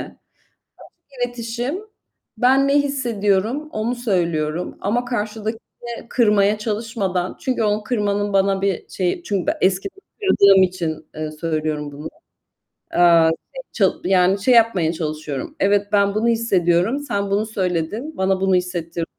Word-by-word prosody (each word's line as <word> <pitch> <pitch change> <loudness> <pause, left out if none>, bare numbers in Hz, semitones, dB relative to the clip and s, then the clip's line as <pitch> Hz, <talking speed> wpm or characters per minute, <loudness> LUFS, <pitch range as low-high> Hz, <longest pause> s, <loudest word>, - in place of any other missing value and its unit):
Açık - - -9 1.1
iletişim, 240 +6 -4 0.6
ben 265 +2 +4
ne 275 - +2
hissediyorum 240 -1 -1
onu 225 +3 -2
söylüyorum 175 -7 -1
ama 240 +5 0
karşıdakini 225 +1 -5
kırmaya 210 -3 +3
çalışmadan 210 -4 -2
çünkü 255 -3 -1
onu 210 0 0
kırmanın 205 -3 -1
bana 195 0 +2
bir 195 -3 -2
şeyi 185 - -2
Çünkü 195 - -2
ben - - +1
eskiden 195 - 0 0.2
kırıldığım 200 - +5
için, 170 -4 -3
ııı, 155 0 -4
söylüyorum 155 -2 -3
bunu. 145 +2 -8 0.9
Eee, 170 -2 +5 0.2
şey - - -7
çal - - +2
yani, 190 +1 +3
şey 255 - +4
yapmaya 195 -8 +3
çalışıyorum. 155 -4 -5
Evet, 200 +1 +2
ben 200 -1 +3
bunu 220 +2 +1
hissediyorum, 200 -1 +2
sen 200 -8 -3
bunu 205 +2 +1
söyledin, 205 - -3
bana 190 0 +1
bunu 190 0 +2
hissettirdi 175 -2 -2
200 Hz, 130 wpm, -21 LUFS, 180-230 Hz, 1.1 s, kırıldığım